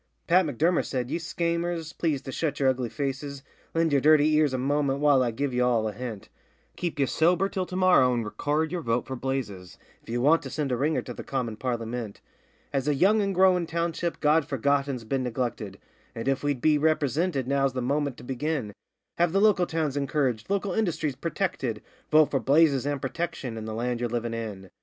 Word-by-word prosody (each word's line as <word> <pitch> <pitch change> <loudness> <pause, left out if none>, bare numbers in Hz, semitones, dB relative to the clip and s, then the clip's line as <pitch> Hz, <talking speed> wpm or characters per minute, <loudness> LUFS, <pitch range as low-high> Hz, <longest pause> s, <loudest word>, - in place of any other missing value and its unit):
Pat 180 0 +4
M'Durmer 160 +6 +1
said, 125 -2 -3
'Ye - - -1
schaymers, 170 -1 -2
please 155 -5 -1
to 135 - -6
shut 145 0 -2
yer 135 - +3
ugly 125 -2 -1
faces, 140 +1 -4 0.3
Lend 165 -2 +2
yer 140 - +5
dirty 155 +1 +5
ears 150 -2 +3
a 130 - -1
momint 140 +1 0
while 145 -2 +4
I 125 - +1
give 130 +3 -2
ye 125 - 0
all 120 -3 +2
a - - -2
hint: 115 -2 -7 0.5
Keep 170 -4 -3
ye 140 - +3
sober 175 +7 +2
till 185 -2 -3
to 185 - -7
morrow 185 -9 +5
and 120 -2 -1
record 150 +8 -1
yer 180 -1 -2
vote 115 -3 0
for 130 - -5
Blazes 120 -9 -4 0.2
If - - -18
ye 120 - -1
want 150 +7 +4
to - - -7
send 145 -4 -2
a - - +2
ringer 150 +6 0
to 125 - -7
the - - -8
commin 125 -5 -3
Parlymint. 115 -2 -4 0.5
'As 135 0 -1
a 150 - +2
young 205 +9 +4
and 195 -2 -1
growin' 180 -2 +4
township 170 +1 -2
God 150 0 +3
Forgotten's 140 -2 0
been 130 +4 -1
neglected, 120 -5 -3 0.4
And, 115 +2 -5
if 135 0 +1
we'd 145 -4 -1
be 155 -1 +3
ripresinted, 155 -1 +1
now's 135 0 +1
the 130 - -2
moment 140 0 -1
to - - -12
begin 130 -3 -3 0.5
Have 175 -1 +2
the 195 - +3
local 200 -4 +4
towns 155 -4 -1
encouraged, 140 -4 -1
local 200 -1 0
industries 165 -9 -1
purtected: 150 - -2 0.3
Vote 155 -1 +5
for 135 - +1
Blazes, 140 +1 +3
and 145 -1 -1
Protection, 135 -3 -4
and 110 -1 -6
the 110 - -4
land 120 +1 -2
ye're 120 0 -1
livin' 120 0 -2
in. 105 -5 -6
140 Hz, 210 wpm, -26 LUFS, 125-160 Hz, 0.5 s, yer